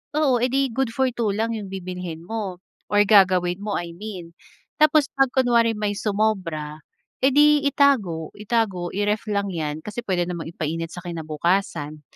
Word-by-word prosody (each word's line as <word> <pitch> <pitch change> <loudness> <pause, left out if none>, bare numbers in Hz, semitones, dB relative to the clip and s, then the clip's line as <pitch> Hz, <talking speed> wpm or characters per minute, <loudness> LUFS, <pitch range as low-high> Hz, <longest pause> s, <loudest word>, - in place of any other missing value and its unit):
oo 285 -5 +3
eh 250 - +2
di 275 0 +2
good 265 -2 0
for 265 +1 +2
2 225 -4 0
lang 225 +2 -1
'yong 205 -3 -6
bibilhin 180 -3 -6
mo 195 -3 -4 0.3
or 205 - +5
gagawin 185 -3 +4
mo, 205 -1 -2
I 170 -1 -6
mean. 180 -4 -8 0.5
Tapos 305 -2 +5
pag 270 -1 +3
kunwari 235 -3 +3
may 210 -1 -1
sumobra, 185 -8 -1 0.4
eh, 265 - +6
di 295 0 +6
itago, 210 - +2
itago, 210 -5 -1
i-ref 205 +2 0
lang 200 -1 0
'yan. 155 -2 -3
Kasi 210 +3 -5
puwede 180 -2 0
namang 170 -2 -5
ipa-init 165 0 -3
sa 180 - -7
kinabukasan. 160 -1 -2
200 Hz, 165 wpm, -23 LUFS, 175-230 Hz, 0.5 s, eh